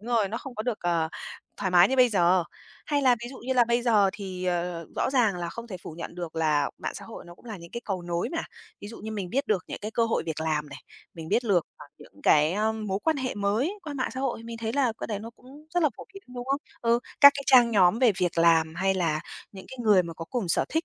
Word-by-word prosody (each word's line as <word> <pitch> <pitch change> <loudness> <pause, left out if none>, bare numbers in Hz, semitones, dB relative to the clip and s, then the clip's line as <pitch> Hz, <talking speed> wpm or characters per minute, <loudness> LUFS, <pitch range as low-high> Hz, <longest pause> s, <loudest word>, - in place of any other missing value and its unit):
Đúng 220 - -10
rồi, 210 -3 +2
nó 220 - -4
không 270 -1 -9
có 215 - -3
được, 240 -3 -2
ờ, 170 -2 0 0.5
thoải 190 -2 -2
mái 180 0 +6
như 265 - 0
bây 250 -1 +6
giờ. 180 -4 +3 0.4
Hay 290 -2 +1
là 255 -2 +5
ví 240 - -5
dụ 270 - -10
như 260 +2 -2
là 245 -2 +5
bây 235 +1 +1
giờ 210 -5 +4
thì, 190 -3 -6
ờ, 175 -2 -2
rõ - - 0
ràng 235 -8 +2
là 175 -1 -4
không 235 +6 -8
thể 200 -5 -6
phủ - - -8
nhận 170 +1 -7
được 170 -2 -6
là 155 -2 +1
mạng - - -4
xã - - -8
hội, 225 - -10
nó 175 - -12
cũng - - -23
là 220 -4 -7
những 170 -1 -12
cái 235 - -5
cầu 190 -3 -3
nối 175 0 -2
nè. 330 0 -3 0.4
Ví 205 - -8
dụ 230 - -10
như 220 - -7
mình 200 -5 -4
biết 275 +4 0
được 195 -4 0
những - - -5
cái 215 - -5
cơ 230 +1 +1
hội 230 - 0
việc 160 -1 -3
làm 155 -2 -1
này, 140 - -9 0.4
mình 160 -1 -8
biết 230 +6 +1
lược, 190 -7 +2
à, - - -12
những - - -17
cái 150 +1 +4
á, 215 +3 +1
mối 210 -3 -3
quan 320 -1 +2
hệ 260 -2 -3
mới 210 - 0
qua 305 -4 -6
mạng 260 -2 -2
xã 260 - -4
hội, 260 -4 -2
mình 230 0 -7
thấy 225 0 -3
là 260 -3 +2
cái - - -4
đấy 210 -3 -3
nó 225 +2 -8
cũng 280 +4 -16
rất 350 - +2
là 305 - +5
phổ - - -9
biến, 390 - -10
đúng 245 0 -5
không? 275 +1 0 0.2
Ừ, 235 0 +3 0.2
các 280 -1 +11
cái 280 - -4
trang 245 -3 +6
nhóm 195 -1 +4
về 245 -4 +5
việc 175 -2 0
làm 165 -1 +4
hay 190 +3 +1
là 165 -4 0 0.3
những 190 -2 -11
cái 260 - -9
người 210 -5 +5
mà 170 -1 -7
có 165 - -7
cùng 225 -1 -3
sở - - +2
thích 320 +1 -1
210 Hz, 290 wpm, -27 LUFS, 175-245 Hz, 0.5 s, các